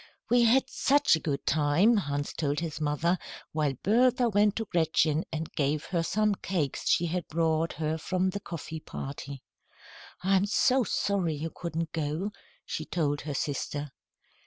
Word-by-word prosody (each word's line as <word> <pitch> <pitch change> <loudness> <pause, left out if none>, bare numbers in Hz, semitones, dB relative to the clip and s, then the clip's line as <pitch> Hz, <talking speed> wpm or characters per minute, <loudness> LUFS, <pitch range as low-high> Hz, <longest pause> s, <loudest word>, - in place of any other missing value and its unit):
"We 245 0 +6
had 255 +3 +4
such 285 - +3
a - - -2
good 145 -3 -3
time," 155 +10 +3
Hans 145 -7 -2
told 145 -2 -1
his 160 -2 -4
mother, 155 +4 +1 0.3
while 150 -3 0
Bertha 245 +3 +3
went 205 -1 +3
to 225 - -2
Gretchen 160 -3 +1
and 160 0 -4
gave 150 +1 0
her 175 -2 0
some 210 +5 +1
cakes 170 -7 -2
she 170 - +3
had 175 +1 -2
brought 165 0 +1
her 155 +1 -2
from 185 +3 0
the 200 - -4
coffee 165 -3 -6
party. 140 -2 -7 0.8
"I'm 195 +1 +3
so 255 +4 +3
sorry 195 -7 0
you 160 +2 -4
couldn't 165 -2 -3
go," 160 +6 -2 0.3
she 155 - -4
told 145 -3 -1
her 145 -1 -4
sister. 145 +1 -3
165 Hz, 160 wpm, -29 LUFS, 150-195 Hz, 0.8 s, We